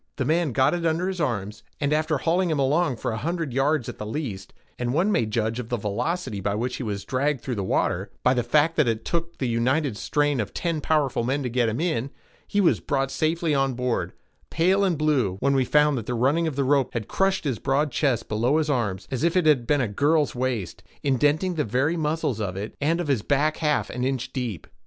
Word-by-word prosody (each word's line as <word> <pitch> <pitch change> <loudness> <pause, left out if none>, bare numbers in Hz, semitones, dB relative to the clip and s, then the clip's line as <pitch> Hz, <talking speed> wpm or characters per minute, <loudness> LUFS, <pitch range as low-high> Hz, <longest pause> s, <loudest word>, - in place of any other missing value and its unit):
The 130 - -2
man 160 +1 +1
got 130 +6 +3
it 175 -1 -2
under 165 +2 +1
his 190 -2 -3
arms, 105 -7 -2 0.2
and 145 0 +1
after 155 0 +1
hauling 170 +5 +1
him 155 - 0
along 140 +1 +2
for 115 - -3
a 110 - -3
hundred 165 0 -2
yards 135 0 +1
at - - -7
the 105 - -4
least—and 120 0 -5
one 185 +6 +2
may 120 - +1
judge 110 +2 -1
of 120 -2 -6
the 120 - 0
velocity 105 - -2
with 100 +1 -1
which 125 +3 -2
he - - -6
was 105 -4 -4
dragged 140 0 0
through 130 - -3
the 100 -4 -2
water, 95 +1 0
by 130 - +4
the 125 - +1
fact 150 +7 +2
that 150 -5 +4
it 115 -1 -1
took 170 0 -2
the 130 - -1
united 125 +3 +1
strain 145 +4 0
of 100 -3 -3
ten 165 -3 -1
powerful 145 -6 +1
men 135 +4 -1
to 125 - -2
get 120 -1 +1
him 110 - -3
in—he 160 - -3
was 185 -4 +3
brought 135 -2 -1
safely 160 0 0
on 135 -2 +1
board, 125 -1 -1 0.4
pale 185 +4 +2
and 180 -5 +1
blue, 140 -11 +1
when 140 +4 +2
we 135 -1 +3
found 150 +2 +3
that 110 - -9
the 125 - -1
running 145 +8 +2
of 155 - -3
the 140 - +1
rope 135 -1 +2
had 115 -3 -3
crushed 195 -3 0
in - - +1
his 115 - -5
broad 140 +2 +1
chest, 125 -3 0
below 120 +7 +1
his 155 -1 +1
arms, 105 -8 -1
as 130 0 -2
if 170 +2 +2
it 180 - +2
had 135 -7 +3
been 145 -2 +3
a 120 - 0
girl's 145 +8 +1
waist, 120 -8 -3 0.2
indenting 145 +6 +2
the 155 -3 0
very 135 +8 0
muscles 150 -7 -1
of 95 -3 -3
it 105 +3 -5
and 165 +4 +1
of 175 - -2
his 135 -7 +1
back 150 +5 +1
half 150 -2 0
an 125 - -3
inch 130 0 -2
deep. 120 - -4
135 Hz, 235 wpm, -25 LUFS, 120-155 Hz, 0.4 s, by